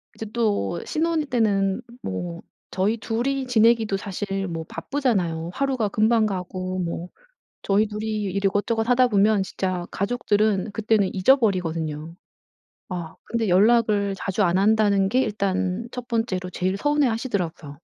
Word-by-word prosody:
이제 220 Hz, -, -6 dB
또 205 Hz, -, 0 dB
신혼 320 Hz, -1 st, 0 dB
때는 205 Hz, -7 st, +1 dB, 0.2 s
뭐 170 Hz, -, -5 dB, 0.3 s
저희 200 Hz, +5 st, +1 dB
2 225 Hz, +2 st, -2 dB
이 275 Hz, -1 st, -1 dB
지내기도 225 Hz, -3 st, +3 dB
사실 195 Hz, 0 st, -4 dB
뭐 165 Hz, -2 st, -4 dB
바쁘잖아요. 185 Hz, -, -1 dB
하루가 265 Hz, -6 st, 0 dB
금방 220 Hz, +2 st, +3 dB
가고 185 Hz, -1 st, -3 dB
뭐 170 Hz, 0 st, -3 dB, 0.6 s
저희 205 Hz, +2 st, +2 dB
2 210 Hz, 0 st, -5 dB
이 215 Hz, -1 st, -2 dB
일 -, -, -5 dB
이것저것 225 Hz, +4 st, 0 dB
하다 250 Hz, 0 st, +4 dB
보면 205 Hz, -1 st, +3 dB
진짜 185 Hz, -2 st, -3 dB
가족들은 210 Hz, -2 st, 0 dB
그때는 215 Hz, -2 st, +1 dB
잊어버리거든요. 170 Hz, -, +1 dB, 0.7 s
아 175 Hz, -4 st, -5 dB
근데 225 Hz, -3 st, -1 dB
연락을 205 Hz, +1 st, +3 dB
자주 195 Hz, +2 st, -1 dB
안 175 Hz, -1 st, +2 dB
한다는 200 Hz, -1 st, +3 dB
게 255 Hz, +6 st, +2 dB
일단 200 Hz, -1 st, -1 dB
1 250 Hz, -1 st, -7 dB
번째로 190 Hz, -6 st, -1 dB
제일 185 Hz, +2 st, -1 dB
서운해하시더라고요. 225 Hz, -, -1 dB
205 Hz, 295 characters per minute, -24 LUFS, 185-230 Hz, 0.7 s, 하다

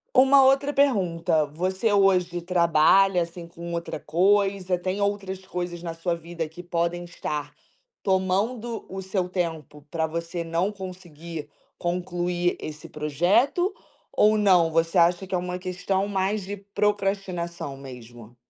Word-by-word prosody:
Uma 270 Hz, +1 st, +7 dB
outra 275 Hz, +2 st, +3 dB
pergunta: 175 Hz, -, +2 dB
você 185 Hz, +8 st, -1 dB
hoje 180 Hz, -3 st, +3 dB
trabalha, 175 Hz, +2 st, +4 dB
assim, 170 Hz, 0 st, -6 dB
com 170 Hz, 0 st, -8 dB
outra 170 Hz, -3 st, -4 dB
coisa? 195 Hz, +3 st, +2 dB
Tem 185 Hz, +3 st, -3 dB
outras 195 Hz, -2 st, -2 dB
coisas 175 Hz, -2 st, -5 dB
na 165 Hz, -1 st, -4 dB
sua 170 Hz, +1 st, -1 dB
vida 170 Hz, -1 st, -5 dB
que 175 Hz, +2 st, -10 dB
podem 175 Hz, 0 st, -1 dB
estar 150 Hz, -3 st, -5 dB, 0.5 s
tomando 205 Hz, +5 st, 0 dB
o 190 Hz, +1 st, -5 dB
seu 185 Hz, -1 st, -2 dB
tempo 160 Hz, -5 st, -4 dB
pra 160 Hz, -1 st, 0 dB
você 170 Hz, +1 st, -4 dB
não 170 Hz, +5 st, 0 dB
conseguir 170 Hz, -5 st, -8 dB, 0.3 s
concluir 175 Hz, 0 st, -1 dB
esse 155 Hz, 0 st, -8 dB
projeto? 180 Hz, -, +2 dB, 0.4 s
Ou 215 Hz, +1 st, +4 dB
não, 180 Hz, -5 st, +4 dB
você 165 Hz, +2 st, +1 dB
acha 175 Hz, +2 st, +3 dB
que 185 Hz, -, -2 dB
é -, -, +2 dB
uma 180 Hz, 0 st, -3 dB
questão 190 Hz, +2 st, -1 dB
mais 200 Hz, +1 st, 0 dB
de 205 Hz, +2 st, -5 dB
procrastinação 195 Hz, -7 st, -2 dB
mesmo? 120 Hz, -3 st, -11 dB
180 Hz, 135 wpm, -25 LUFS, 170-195 Hz, 0.5 s, Uma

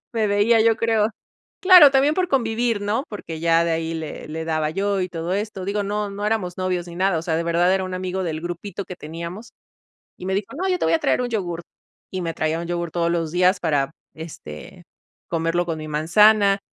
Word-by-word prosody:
me 225 Hz, -2 st, +1 dB
veía, 205 Hz, +3 st, +3 dB
yo 225 Hz, 0 st, +4 dB
creo. 225 Hz, -2 st, +2 dB, 0.5 s
Claro, 365 Hz, -7 st, +9 dB
también 275 Hz, +2 st, +3 dB
por 370 Hz, -1 st, +1 dB
convivir, 230 Hz, -5 st, 0 dB
¿no?, 210 Hz, +5 st, -1 dB
porque 170 Hz, -6 st, -7 dB
ya 165 Hz, 0 st, +3 dB
de 170 Hz, -, 0 dB
ahí 165 Hz, 0 st, -2 dB
le 160 Hz, -2 st, -6 dB
le 160 Hz, +1 st, -5 dB
daba 155 Hz, -1 st, -1 dB
yo, 195 Hz, +2 st, 0 dB
y 180 Hz, -, -1 dB
todo 170 Hz, 0 st, -5 dB
esto, 200 Hz, -1 st, -3 dB
digo, 205 Hz, +1 st, -1 dB
no 205 Hz, +1 st, -2 dB
no 200 Hz, +1 st, -5 dB
éramos 210 Hz, -5 st, -1 dB
novios 180 Hz, -2 st, -2 dB
ni 170 Hz, -, -9 dB
nada. 185 Hz, -1 st, +1 dB
O -, -, -6 dB
sea, 165 Hz, -1 st, -1 dB
de 170 Hz, -, -1 dB
verdad 175 Hz, +2 st, +2 dB
era 190 Hz, -, 0 dB
un 185 Hz, 0 st, -5 dB
amigo 185 Hz, +1 st, -3 dB
del 160 Hz, -2 st, -3 dB
grupito 175 Hz, +3 st, -5 dB
que 180 Hz, -, -8 dB
teníamos 170 Hz, +8 st, -8 dB, 0.7 s
y -, -, -9 dB
me 190 Hz, -, -1 dB
dijo: 200 Hz, +1 st, -1 dB
"No, 375 Hz, +3 st, -1 dB
yo 365 Hz, -1 st, 0 dB
te -, -, 0 dB
voy 165 Hz, -, +2 dB
a -, -, 0 dB
traer -, -, +1 dB
un 245 Hz, -, -2 dB
yogurt". 175 Hz, -6 st, -3 dB, 0.5 s
Y 185 Hz, -, -4 dB
me 165 Hz, -1 st, -3 dB
traía 155 Hz, +1 st, -1 dB
un 170 Hz, -, -5 dB
yogurt 170 Hz, -1 st, -3 dB
todos 170 Hz, -1 st, +1 dB
los 165 Hz, -2 st, -1 dB
días 180 Hz, +2 st, +3 dB
para, 145 Hz, -5 st, 0 dB, 0.2 s
este, 150 Hz, -, -10 dB, 0.4 s
comerlo 165 Hz, +1 st, 0 dB
con 165 Hz, -2 st, -3 dB
mi 155 Hz, 0 st, -7 dB
manzana. 200 Hz, +6 st, +4 dB
180 Hz, 225 wpm, -22 LUFS, 165-210 Hz, 0.7 s, Claro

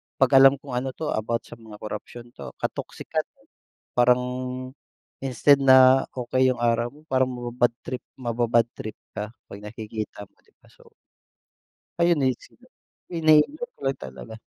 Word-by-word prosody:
'pag 135 Hz, 0 st, +2 dB
alam 135 Hz, +1 st, +8 dB
kung 140 Hz, 0 st, -12 dB
ano 130 Hz, +1 st, -3 dB
'to 155 Hz, -, -3 dB
about 115 Hz, +2 st, -2 dB
sa 120 Hz, -, -13 dB
mga 110 Hz, -2 st, -12 dB
korapsiyon 115 Hz, +3 st, -8 dB
'to, -, -, -10 dB
ka-toxican, -, -, -4 dB, 0.2 s
eh, -, -, -31 dB, 0.4 s
parang 125 Hz, 0 st, +4 dB, 1.0 s
instead 135 Hz, +2 st, +3 dB
na 130 Hz, -1 st, +6 dB
okey 130 Hz, +1 st, +1 dB
yung 120 Hz, -1 st, -5 dB
araw 115 Hz, 0 st, +2 dB
mo, 150 Hz, +1 st, -18 dB
parang 130 Hz, 0 st, +3 dB
maba-bad 120 Hz, 0 st, 0 dB
trip 130 Hz, -, -5 dB
maba-bad 120 Hz, -1 st, +1 dB
trip 110 Hz, -1 st, -8 dB, 0.2 s
ka 105 Hz, +3 st, -6 dB, 0.2 s
'pag 100 Hz, -, -8 dB
nakikita 105 Hz, 0 st, -7 dB
mo -, -, -17 dB
'di -, -, -31 dB
ba, -, -, -21 dB
so -, -, -21 dB, 1.1 s
ayun 170 Hz, -1 st, +4 dB
naisip 130 Hz, -2 st, -2 dB
ko, -, -, -22 dB, 0.5 s
iniisip 165 Hz, -, +3 dB
ko -, -, -28 dB
lang 135 Hz, 0 st, 0 dB
talaga. 65 Hz, +12 st, -9 dB
125 Hz, 160 wpm, -25 LUFS, 115-135 Hz, 1.1 s, alam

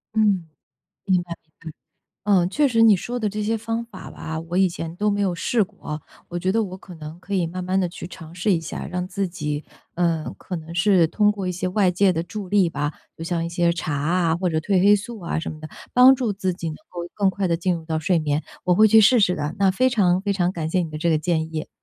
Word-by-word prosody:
嗯， 200 Hz, -6 st, +2 dB, 0.6 s
明 185 Hz, -3 st, +3 dB
白， 175 Hz, -1 st, -9 dB
嗯。 160 Hz, -, -29 dB, 0.8 s
嗯， 190 Hz, -3 st, +3 dB
确 290 Hz, +8 st, +2 dB
实 230 Hz, -3 st, +2 dB
你 220 Hz, -2 st, +7 dB
说 240 Hz, +7 st, -4 dB
的 220 Hz, -, 0 dB
这 210 Hz, +1 st, -3 dB
些 225 Hz, +2 st, 0 dB
方 225 Hz, +1 st, -3 dB
法 215 Hz, -5 st, -11 dB
吧， 160 Hz, 0 st, -5 dB
我 165 Hz, +2 st, -4 dB
以 190 Hz, -1 st, +4 dB
前 165 Hz, -1 st, -6 dB
都 210 Hz, +3 st, +1 dB
没 205 Hz, 0 st, 0 dB
有 195 Hz, -3 st, +1 dB
试 215 Hz, +6 st, +1 dB
过。 185 Hz, -6 st, -7 dB, 0.3 s
我 175 Hz, -, -5 dB
觉 185 Hz, +2 st, 0 dB
得 225 Hz, +2 st, +2 dB
我 185 Hz, -2 st, -6 dB
可 185 Hz, -, -13 dB
能 155 Hz, +1 st, -9 dB
可 200 Hz, +2 st, -7 dB
以 180 Hz, -4 st, +1 dB
慢 180 Hz, +2 st, -5 dB
慢 185 Hz, +1 st, +1 dB
地 180 Hz, -2 st, 0 dB
去 170 Hz, -, -8 dB
尝 165 Hz, -3 st, -11 dB
试 185 Hz, +3 st, +1 dB
一 165 Hz, -, 0 dB
下， 165 Hz, -, -6 dB
让 180 Hz, 0 st, -3 dB
自 195 Hz, 0 st, -2 dB
己， 150 Hz, -4 st, -4 dB, 0.3 s
呃， 165 Hz, -2 st, 0 dB
可 185 Hz, -, -6 dB
能 165 Hz, 0 st, -8 dB
是 180 Hz, -2 st, +4 dB
通 210 Hz, +5 st, +3 dB
过 200 Hz, -3 st, -4 dB
一 -, -, 0 dB
些 180 Hz, +1 st, -3 dB
外 190 Hz, 0 st, +3 dB
界 185 Hz, +1 st, +3 dB
的 165 Hz, -, -1 dB
助 200 Hz, +3 st, -6 dB
力 195 Hz, -2 st, +3 dB
吧， 145 Hz, -1 st, -2 dB, 0.2 s
就 165 Hz, -, -6 dB
像 165 Hz, 0 st, -1 dB
一 -, -, -4 dB
些 170 Hz, 0 st, +1 dB
茶 170 Hz, -3 st, -3 dB
啊， 165 Hz, +3 st, +1 dB
或 180 Hz, +2 st, -1 dB
者 160 Hz, -, -1 dB
褪 185 Hz, +3 st, +1 dB
黑 205 Hz, +2 st, +6 dB
素 215 Hz, +3 st, -6 dB
啊 170 Hz, -1 st, -2 dB
什 -, -, -4 dB
么 155 Hz, -, -10 dB
的， 155 Hz, -, -8 dB, 0.2 s
帮 250 Hz, +2 st, +8 dB
助 245 Hz, -4 st, -1 dB
自 190 Hz, -2 st, -2 dB
己 170 Hz, -1 st, -5 dB
能 155 Hz, -, -6 dB
够 175 Hz, -1 st, -6 dB
更 200 Hz, -2 st, +3 dB
快 190 Hz, +1 st, -1 dB
地 170 Hz, -1 st, +1 dB
进 180 Hz, +2 st, 0 dB
入 165 Hz, -1 st, -5 dB
到 160 Hz, 0 st, -2 dB
睡 165 Hz, +2 st, +1 dB
眠。 150 Hz, 0 st, -1 dB, 0.2 s
我 180 Hz, -1 st, +3 dB
会 215 Hz, +3 st, +6 dB
去 220 Hz, +1 st, +7 dB
试 235 Hz, +4 st, +6 dB
试 180 Hz, -4 st, +3 dB
的， 150 Hz, +1 st, -3 dB
那 195 Hz, -1 st, +3 dB
非 255 Hz, +7 st, +2 dB
常 185 Hz, -7 st, +2 dB
非 200 Hz, 0 st, -1 dB
常 180 Hz, -2 st, +1 dB
感 160 Hz, -4 st, -4 dB
谢 185 Hz, +2 st, +1 dB
你 165 Hz, -, -4 dB
的 155 Hz, -, -5 dB
这 170 Hz, -, +1 dB
个 160 Hz, -, +3 dB
建 160 Hz, 0 st, -1 dB
议。 155 Hz, -, -3 dB
180 Hz, 285 characters per minute, -23 LUFS, 165-200 Hz, 0.8 s, 帮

